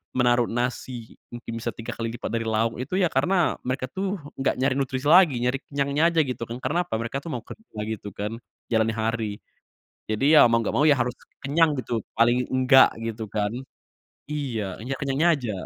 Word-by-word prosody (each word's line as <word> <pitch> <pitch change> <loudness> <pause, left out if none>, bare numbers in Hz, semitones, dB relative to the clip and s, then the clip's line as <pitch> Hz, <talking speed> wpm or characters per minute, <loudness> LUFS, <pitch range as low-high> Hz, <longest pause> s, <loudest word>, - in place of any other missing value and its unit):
menaruh 120 -1 +3
nasi, 120 -1 -3 0.2
mungkin 115 -1 -7
bisa 120 0 -4
3 110 - -6
kali 115 - -4
lipat 115 - -5
dari 115 0 -2
lauk 110 +1 0
itu 130 +8 -3
ya 180 - +3
karena 170 +5 +2
mereka 130 0 -2
tuh 195 +1 -2 0.2
gak 135 - +1
nyari 135 +2 +1
nutrisi 130 -1 -2
lagi, 175 -5 +7
nyari 125 +2 +1
kenyangnya 140 +1 0
aja 165 - +2
gitu 125 -4 -4
kan. 115 - -5
Karena 145 +7 0
apa? - - -7
Mereka 115 +4 -3
tuh 140 - -12
mau 120 - -4
kerja 170 - -12
gitu 110 -1 -5
kan, 105 +1 -3 0.4
jalani 110 -1 +2
hari. 110 0 -1 0.8
Jadi, 135 +9 +3
ya - - +9
mau 115 -1 +3
gak 115 - -2
mau 145 - +3
ya 145 -4 +4
harus 120 +1 -1 0.2
kenyang 155 +3 +2
gitu, 115 -4 -3
paling 120 +2 +3
enggak 130 0 +6
gitu 115 -1 -4
kan. 105 -1 -1 0.8
Iya, 120 -10 -3
hanya 125 +5 -4
kenyangnya 140 +4 +1
aja. 125 -6 -4
125 Hz, 190 wpm, -25 LUFS, 115-140 Hz, 0.8 s, ya